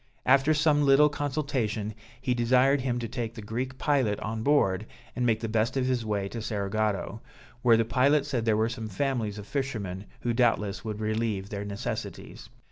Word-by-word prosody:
After 135 +4 +4
some 150 -1 +3
little 140 +2 +6
consultation, 130 -8 -2 0.3
he 125 - 0
desired 130 +3 +3
him 125 -2 -1
to 120 -1 -3
take 115 -1 -4
the 110 - -7
Greek 125 +5 -4
pilot 130 -10 +1
on 110 0 -3
board, 110 -7 +2 0.3
and 125 -1 0
make 110 -1 +1
the 115 - -2
best 110 +4 0
of 130 - +1
his 130 -2 0
way 105 -3 -1
to 115 - -5
Cerigotto, 105 +1 -2 0.4
where 120 -2 +5
the 115 - +2
pilot 135 +5 +3
said 130 -6 -1
there 110 -2 +2
were 110 +1 +2
some 115 -1 -5
families 110 -2 -1
of 105 - -7
fishermen, 105 -9 -3 0.2
who 120 - 0
doubtless 105 -5 +1
would 110 -2 -4
relieve 110 -2 -1
their 100 -1 -4
necessities. 110 +3 -6
115 Hz, 185 wpm, -28 LUFS, 110-130 Hz, 0.4 s, little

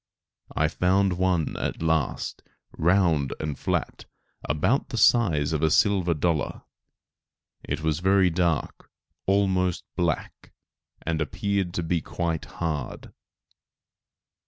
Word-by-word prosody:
I - - +3
found 95 +1 +2
one 90 -4 +1
at - - -3
last, 80 -4 -1 0.3
round 85 -5 +2
and 75 -2 -3
flat, - - -2 0.4
about 115 - 0
the 120 - -4
size 85 -12 +3
of 75 - 0
a 80 - +3
silver 90 -1 +3
dollar. 80 -1 -1 1.0
It - - -3
was 80 -1 0
very 95 0 +3
dark, 85 -3 -1 0.4
almost 95 -2 +1
black, - - -3 0.5
and 80 -1 -1
appeared 95 +3 -1
to 85 - -1
be 80 0 0
quite 85 0 -3
hard. 75 -6 -5
85 Hz, 110 wpm, -26 LUFS, 80-95 Hz, 1.0 s, I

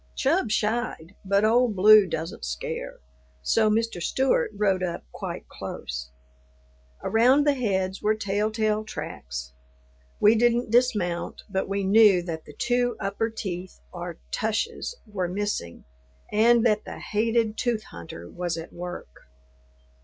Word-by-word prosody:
Chub 290 - +1
shied, 215 -5 -1
but 200 +2 +2
Old 235 0 +3
Blue 210 +1 +7
doesn't 160 - -5
scare, 65 0 -4 0.5
so 220 - +3
Mr. 225 -4 0
Stewart 265 +9 +1
rode 195 -3 +2
up 180 -2 -3
quite - - -6
close. 65 0 -6 0.9
Around 255 +6 +4
the 290 - +4
heads 190 -7 -1
were 215 +1 +2
tell 210 0 0
tale 215 -1 0
tracks. 65 - -6 0.7
We 210 - +6
didn't 240 0 +2
dismount, 210 -8 +1
but 190 -2 -2
we 200 0 -1
knew 200 -2 +6
that 160 -2 -5
the 150 - -13
two 245 -1 +1
upper 205 +2 -1
teeth 185 -4 -6
or 175 -1 -6
tushes 225 - -2
were 200 -5 -3
missing 185 - -3 0.5
and 230 +2 +4
that 215 -2 +3
the - - -8
hated 220 +1 0
tooth 230 -2 -1
hunter 85 0 -10
was 175 - -3
at 165 +1 -8
work. 175 - -8
210 Hz, 135 wpm, -26 LUFS, 180-225 Hz, 0.9 s, Blue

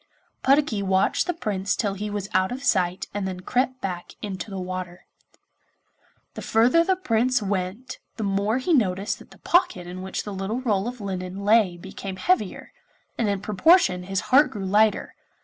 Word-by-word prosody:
Puddocky 275 -6 +3
watched 190 - +1
the 355 - 0
Prince 200 - -1
till 205 -3 -1
he 210 +2 -4
was 205 -1 -4
out 185 +2 +2
of 260 +2 -5
sight 185 -8 +1
and 200 -1 -2
then 185 -1 -5
crept 255 +5 -1
back 180 -2 -5
into 200 +1 -5
the 195 - -6
water. 185 -1 -6 1.3
The - - -7
further 245 +9 +4
the 380 +2 +2
Prince 250 -6 +1
went 200 +3 -3 0.2
the 220 - -3
more 200 +3 +1
he 265 +7 0
noticed 200 -6 +1
that - - -15
the - - -16
pocket 265 - +1
in 180 +1 -7
which 190 0 -4
the 205 - -6
little 195 +5 -3
roll 215 -5 0
of 245 -2 -6
linen 190 0 -5
lay 205 -5 +4
became 190 +1 -7
heavier, 365 - -1 0.5
and 225 -3 +1
in 200 -1 -1
proportion 210 - +4
his 195 0 -1
heart 290 +3 +7
grew 200 -3 -6
lighter. 210 +2 +2
200 Hz, 180 wpm, -24 LUFS, 190-240 Hz, 1.3 s, heart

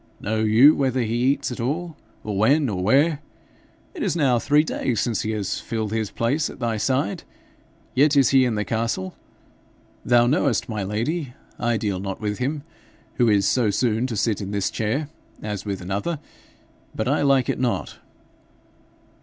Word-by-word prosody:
'Know 110 +1 -2
you 110 +7 +6
whether 130 -2 0
he 115 -1 -2
eats 125 +3 +1
at 125 - -6
all, 155 +7 -2 0.3
or 105 -2 -4
when, 135 +7 +3
or 95 -3 -2
where? 140 - +3 0.7
It - - -8
is - - 0
now 135 -7 +2
three 150 +5 +3
days 125 -7 -2
since 115 -3 0
he 110 - -3
has 105 -3 -2
filled 110 -2 -3
his 110 -2 -1
place 140 +7 -1
at - - -10
thy 115 -3 -1
side, 130 -1 0 0.7
yet 145 +2 +3
is 135 - +5
he 135 -1 +5
in 120 -3 0
the 105 0 -1
castle. 110 -3 -2 0.9
Thou 120 -1 +4
knowest, 135 -2 +1
my 110 -4 -3
lady, 120 - -3 0.2
I 120 -1 +1
deal 100 -4 -2
not 95 0 -5
with 105 -1 -3
him, 140 +3 -2 0.5
who 120 -2 +4
is 100 -2 +3
so 120 -4 +2
soon 115 +3 0
to 115 -4 -4
sit 105 0 0
in 100 - -5
this 100 -2 -1
chair, 125 +8 -1 0.4
as 105 -2 -4
with 100 -3 -4
another, 100 - -2 0.8
but - - -2
I - - +1
like 135 -3 +3
it - - -1
not. 125 -2 -2
115 Hz, 180 wpm, -23 LUFS, 105-135 Hz, 0.9 s, you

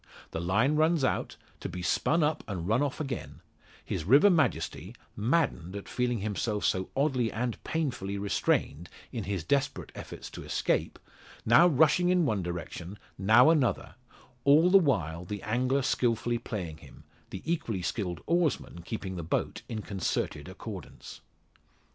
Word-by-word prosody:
The 80 - -3
line 115 - +2
runs 160 -1 +3
out, 130 - -1 0.2
to - - -5
be 90 0 -6
spun 165 - +2
up 155 +1 0
and 90 -5 -4
run 110 +5 +2
off 145 -2 -1
again; 135 -4 -5 0.5
his - - -3
river 140 - +6
majesty, 125 - 0 0.2
maddened 110 - 0
at 100 - -7
feeling 125 -3 -1
himself 105 +1 -2
so 95 0 0
oddly 130 -5 +1
and 120 +1 -3
painfully 125 -11 -2
restrained 90 -4 0 0.2
in 115 -5 -4
his 95 -4 -2
desperate 140 - -1
efforts - - -9
to - - -8
escape, - - -1 0.5
now 120 +10 +7
rushing 160 +3 +4
in 180 -2 +3
one 110 -8 0
direction, 85 +2 -6 0.2
now 110 +9 +6
another, 145 -7 +1 0.5
all 155 +6 +5
the 195 - +8
while 90 - 0
the 100 +3 -6
angler 130 +5 +1
skilfully 120 -2 +1
playing 90 -9 -5
him, - - -15 0.3
the 95 - -7
equally 120 - -2
skilled 90 -4 -3
oarsman 170 - 0
keeping 95 0 -5
the 85 - -4
boat 80 - -2
in 110 -2 -4
concerted 100 -3 -2
accordance. - - -9
115 Hz, 150 wpm, -29 LUFS, 95-145 Hz, 0.5 s, the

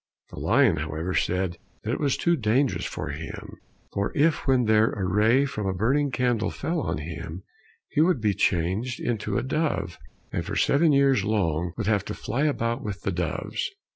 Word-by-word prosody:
The - - -8
lion, 115 -4 +3
however, 80 +4 -3
said 90 -2 0 0.3
that 110 - -2
it - - -2
was 140 -3 +1
too 170 0 +2
dangerous 125 +1 +1
for 75 - -4
him, 70 0 -7 0.4
for 100 0 -1
if 155 +1 +2
when 130 -2 +4
there 110 +1 +4
a 100 -3 -2
ray 110 +8 +3
from 105 -7 -3
a 95 - -1
burning 135 +9 +2
candle 120 -4 0
fell 165 0 -2
on - - -2
him, 80 +3 -6 0.5
he 150 - +2
would 170 -3 +3
be 105 -2 +1
changed 95 +9 0
into 115 -2 -2
a 120 - 0
dove, 130 - -1 0.3
and - - -2
for - - -5
seven 155 +3 +3
years 135 -6 +4
long 90 -5 0
would 110 - -2
have 105 -1 +2
to 105 - -5
fly 140 +5 -1
about 120 -3 0
with 105 -6 -5
the 95 - 0
doves. 90 - -2
110 Hz, 190 wpm, -26 LUFS, 95-135 Hz, 0.5 s, when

